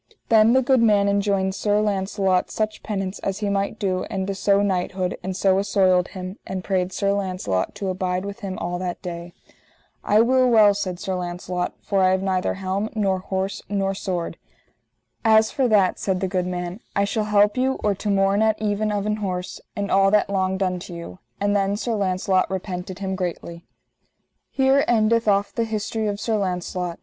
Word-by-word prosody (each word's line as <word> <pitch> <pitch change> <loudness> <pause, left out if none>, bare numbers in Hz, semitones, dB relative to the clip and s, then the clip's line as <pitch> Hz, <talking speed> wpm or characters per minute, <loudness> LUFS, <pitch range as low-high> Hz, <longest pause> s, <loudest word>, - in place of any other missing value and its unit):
Then 225 +1 +6
the 260 0 +4
good 260 -1 +3
man 205 -3 +4
enjoined 200 -1 +1
Sir 205 +1 +1
Launcelot 195 -2 0
such 215 0 -2
penance 195 -2 -3
as 195 0 -3
he 210 -1 -2
might 200 +2 -1
do 185 -3 -1
and 190 -3 -3
to 195 - -2
sewe 200 +1 +2
knighthood, 185 -1 -1
and 185 0 -4
so 190 -1 +3
assoiled 190 -3 +2
him, 185 +1 -8
and 190 -1 -4
prayed 185 -1 0
Sir 200 +1 0
Launcelot 185 - -2
to 200 -1 -4
abide 185 0 -2
with 200 +2 -6
him 195 -4 -5
all 175 +1 -3
that 180 -1 -4
day. 175 -1 -6 0.7
I 210 +2 +4
will 255 +2 +3
well, 215 -3 +6
said 185 -3 -4
Sir 190 - -3
Launcelot, 180 0 -3
for 195 -2 +1
I 185 - +5
have 190 0 +1
neither 185 -1 0
helm, 195 +3 -2
nor 195 -3 +1
horse, 190 +1 -3
nor 195 -1 0
sword. 180 -3 -3 0.9
As 220 -1 +5
for 265 -2 +1
that, 200 -5 +3
said 190 -2 -1
the 190 - -1
good 180 -1 -1
man, 180 +1 -4 0.2
I 200 - +3
shall 210 +1 -1
help 210 0 +3
you 260 +1 +1
or 210 - +2
to 205 +2 -4
morn 195 +1 +2
at 220 -1 +2
even 215 0 0
of 205 -1 -1
an 210 0 0
horse, 185 -3 -4
and 200 -1 -3
all 195 0 +5
that 205 -1 +2
longed 190 0 0
unto 180 -1 -3
you. 130 - -9 0.2
And 205 0 +1
then 200 0 +1
Sir 235 +2 -2
Launcelot 185 -2 +1
repented 185 -1 -5
him 190 -1 -3
greatly. 170 -2 -5 0.9
_Here 270 +1 +4
endeth 230 0 +2
off 200 0 +2
the 230 - 0
history 220 0 -2
of 205 -1 -2
Sir 220 0 0
Launcelot. 180 -2 -3
195 Hz, 195 wpm, -23 LUFS, 185-210 Hz, 0.9 s, Then